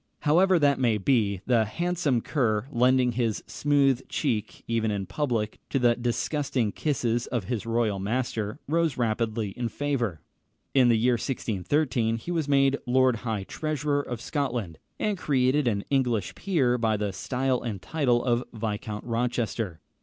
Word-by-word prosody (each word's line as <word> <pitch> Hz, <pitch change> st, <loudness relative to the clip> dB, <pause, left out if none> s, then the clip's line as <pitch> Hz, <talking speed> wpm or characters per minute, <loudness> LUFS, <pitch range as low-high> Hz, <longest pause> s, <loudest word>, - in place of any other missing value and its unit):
However 180 Hz, +5 st, +4 dB
that 145 Hz, -3 st, +3 dB
may 120 Hz, -4 st, +2 dB
be, 100 Hz, -3 st, +1 dB
the 120 Hz, -3 st, +3 dB
handsome 170 Hz, -1 st, 0 dB
Kerr, 110 Hz, -7 st, 0 dB
lending 125 Hz, 0 st, +3 dB
his 115 Hz, -2 st, -1 dB
smooth 140 Hz, -3 st, +1 dB
cheek 110 Hz, -2 st, -2 dB
even 115 Hz, -1 st, 0 dB
in 100 Hz, -2 st, -2 dB
public 115 Hz, -7 st, -2 dB
to -, -, 0 dB
the 120 Hz, -2 st, +4 dB
disgusting 125 Hz, 0 st, -1 dB
kisses 120 Hz, -5 st, -1 dB
of 120 Hz, -5 st, -2 dB
his 110 Hz, +2 st, -3 dB
royal 115 Hz, -4 st, +1 dB
master, 110 Hz, +1 st, -2 dB
rose 165 Hz, -2 st, +1 dB
rapidly 110 Hz, -2 st, 0 dB
in 120 Hz, +3 st, -3 dB
favour. 120 Hz, -, -2 dB, 0.5 s
In 130 Hz, -3 st, +5 dB
the 115 Hz, -, +4 dB
year 120 Hz, +2 st, +3 dB
1613, 120 Hz, -, 0 dB
he 145 Hz, +10 st, -6 dB
was 160 Hz, -4 st, -1 dB
made 135 Hz, -1 st, +3 dB
Lord 130 Hz, -1 st, +3 dB
High 110 Hz, -3 st, -3 dB
Treasurer 150 Hz, +3 st, -1 dB
of 120 Hz, -5 st, -6 dB
Scotland, 120 Hz, -, -3 dB, 0.2 s
and 210 Hz, -3 st, -1 dB
created 135 Hz, 0 st, +2 dB
an 100 Hz, -3 st, 0 dB
English 120 Hz, -7 st, +1 dB
peer 135 Hz, -11 st, +1 dB
by 110 Hz, -2 st, +1 dB
the 105 Hz, -1 st, -2 dB
style 130 Hz, +5 st, -1 dB
and 110 Hz, -5 st, -4 dB
title 125 Hz, -, +1 dB
of 120 Hz, -1 st, +2 dB
Viscount 105 Hz, -1 st, -4 dB
Rochester. 115 Hz, -6 st, -2 dB
120 Hz, 155 wpm, -27 LUFS, 110-140 Hz, 0.5 s, In